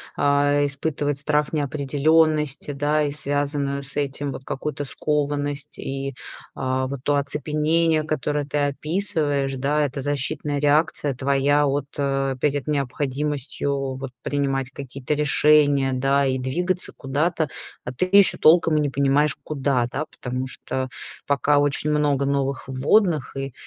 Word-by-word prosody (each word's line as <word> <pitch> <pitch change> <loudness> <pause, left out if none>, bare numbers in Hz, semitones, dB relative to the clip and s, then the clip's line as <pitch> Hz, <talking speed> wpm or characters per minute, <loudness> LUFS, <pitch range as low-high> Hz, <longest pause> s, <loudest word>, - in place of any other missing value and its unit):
а, 145 0 +3
испытывать 145 0 -2
страх 150 +2 0
неопределенности, 150 +1 +1
да, 145 +2 +1
и 145 - 0
связанную 140 -1 -2
с 135 - -11
этим 140 0 -2
вот 130 - -8
какую-то 145 +1 -4
скованность 145 0 -2
и, 135 0 -4 0.4
а, 130 0 -1
вот 135 0 -4
то 145 - +2
оцепенение, 155 +3 +1
которое 150 -1 -1
ты 145 +1 -3
описываешь, 145 -2 -1
да, 145 +3 +1
это 140 -1 -3
защитная 145 +1 -1
реакция 145 -1 +1
твоя, 140 +2 +2
вот, 140 0 -1
э, 135 -1 0
перед 145 +1 0
необходимостью, 140 -1 -2
вот, 135 0 -6
принимать 135 -2 -1
какие-то 135 +2 -4
решения, 145 -2 +3
да, 135 +2 +2
и 130 0 0
двигаться 175 +8 -2
куда-то, 150 +3 -1 0.3
а 125 - -5
ты 185 +9 +4
ещё 200 - +5
толком 165 0 +5
и - - +3
не 145 - 0
понимаешь 140 +1 +2
куда, 135 -5 0
да, 145 - -2
потому 125 +1 -4
что 130 0 -4 0.4
пока 145 +1 +2
очень 145 +1 +1
много 145 -2 +2
новых 140 -2 -1
вводных 150 +4 +2
и, 135 -2 -4
145 Hz, 135 wpm, -23 LUFS, 135-150 Hz, 0.4 s, ещё